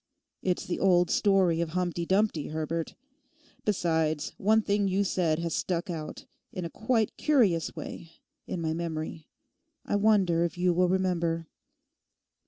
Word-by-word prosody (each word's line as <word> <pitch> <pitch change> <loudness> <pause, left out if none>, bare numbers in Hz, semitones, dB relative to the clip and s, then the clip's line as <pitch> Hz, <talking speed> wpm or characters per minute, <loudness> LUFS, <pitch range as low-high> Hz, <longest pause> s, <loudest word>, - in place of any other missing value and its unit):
It's 180 -1 -1
the 175 - -3
old 180 -2 +3
story 190 -5 +3
of 170 +1 -3
Humpty 175 -2 -1
Dumpty, 190 -6 +1
Herbert. 160 +1 -3 0.7
Besides, 160 -6 0
one 220 +2 +3
thing 205 -1 +1
you 195 +1 +1
said 175 -5 +1
has 170 0 -3
stuck 180 +1 -2
out 155 -2 -6 0.3
in 180 -2 -5
a 165 - -5
quite 220 -1 0
curious 215 - +2
way 165 -1 -8 0.3
in 175 - -3
my 160 -1 -1
memory. 160 -1 -4 0.6
I - - 0
wonder 195 -5 +3
if 170 +1 -2
you 180 0 +2
will 180 +1 +2
remember? 170 -3 0
175 Hz, 145 wpm, -28 LUFS, 165-195 Hz, 0.7 s, old